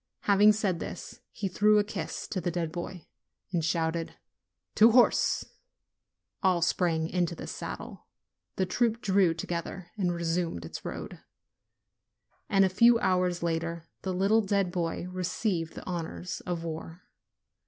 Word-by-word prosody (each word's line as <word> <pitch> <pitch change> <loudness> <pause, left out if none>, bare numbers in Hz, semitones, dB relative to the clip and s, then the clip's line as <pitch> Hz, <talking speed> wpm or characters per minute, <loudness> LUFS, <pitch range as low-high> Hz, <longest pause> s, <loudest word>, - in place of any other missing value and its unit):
Having 205 +1 +6
said 200 -5 0
this, - - -7
he 205 - -3
threw 210 +3 +4
a 210 - +4
kiss 205 - -5
to 185 - -2
the 175 - -1
dead 170 -2 -2
boy, 175 -1 -6 0.5
and 170 -3 0
shouted 165 0 -1 0.6
"To 220 +2 +7
horse 245 -1 +4 0.5
!" - - -57
All 180 -3 +3
sprang 165 -2 +1
into 175 -1 -1
the - - -7
saddle, - - -7 0.5
the 190 - +1
troop 230 +4 +1
drew 190 -5 +3
to 165 - -5
gether 175 +1 -5
and 180 -3 +1
resumed 170 - -2
its - - -7
road. - - -6 1.3
And 195 -1 +5
a - - +4
few 235 +6 +5
hours 180 -4 +1
later 165 0 -2
the 190 - -2
little 195 +5 +3
dead 195 -3 0
boy 175 -1 -2
received 180 -1 -2
the - - -8
honors 175 0 -4
of 175 -2 -2
war. 165 +1 -6
180 Hz, 150 wpm, -29 LUFS, 170-195 Hz, 1.3 s, To